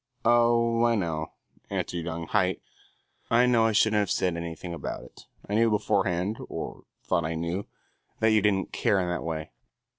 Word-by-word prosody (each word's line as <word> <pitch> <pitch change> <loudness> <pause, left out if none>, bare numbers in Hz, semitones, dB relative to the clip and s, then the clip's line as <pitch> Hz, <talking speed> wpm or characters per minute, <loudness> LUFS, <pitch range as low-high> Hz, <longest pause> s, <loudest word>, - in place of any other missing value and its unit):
"Oh, 115 0 +4
I 120 0 +4
know," 80 -5 -2 0.4
answered 85 -2 -3
young 85 0 -4
Haight. 90 +2 +1 0.7
"I 120 +2 +5
know 120 -2 +4
I - - +2
shouldn't 110 0 +3
have 100 -3 0
said 90 -2 +1
anything 85 +1 -5
about 85 - -5
it. - - -16 0.2
I 100 - -4
knew 115 +2 +4
beforehand, 100 -1 0
or - - -6 0.2
thought 85 - +1
I 80 +1 -2
knew, 85 +4 -3 0.5
that 110 0 +4
you 110 -1 +4
didn't 95 -2 +1
care 100 - +2
in 90 - -1
that 90 - -2
way." 80 -1 -4
95 Hz, 175 wpm, -27 LUFS, 85-115 Hz, 0.7 s, I